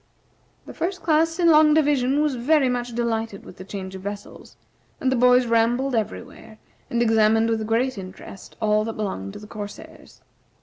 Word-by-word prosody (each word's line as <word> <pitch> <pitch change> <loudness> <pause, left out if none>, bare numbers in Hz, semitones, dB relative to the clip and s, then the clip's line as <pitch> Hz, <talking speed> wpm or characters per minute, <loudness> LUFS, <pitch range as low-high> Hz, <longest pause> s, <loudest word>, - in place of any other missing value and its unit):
The - - -10
First 365 +1 -4
Class 325 +1 +2
in 340 -2 +4
Long 305 -1 +6
Division 285 -2 +2
was 300 -2 0
very 265 +2 +2
much 245 -1 -3
delighted 225 -3 -2
with - - -13
the 185 - -9
change 190 -1 -7
of 190 - -8
vessels, 200 +1 -8 0.4
and 260 - 0
the - - +2
boys 250 +1 +4
rambled 240 +3 +1
everywhere, 215 - -5 0.3
and 235 0 +1
examined 225 0 +3
with 220 -1 -2
great 235 +1 0
interest 190 +1 -11
all 215 -1 +2
that 225 - -4
belonged 100 - -4
to - - -9
the 210 - -11
corsairs. 205 -1 -10
230 Hz, 175 wpm, -23 LUFS, 210-265 Hz, 0.4 s, Long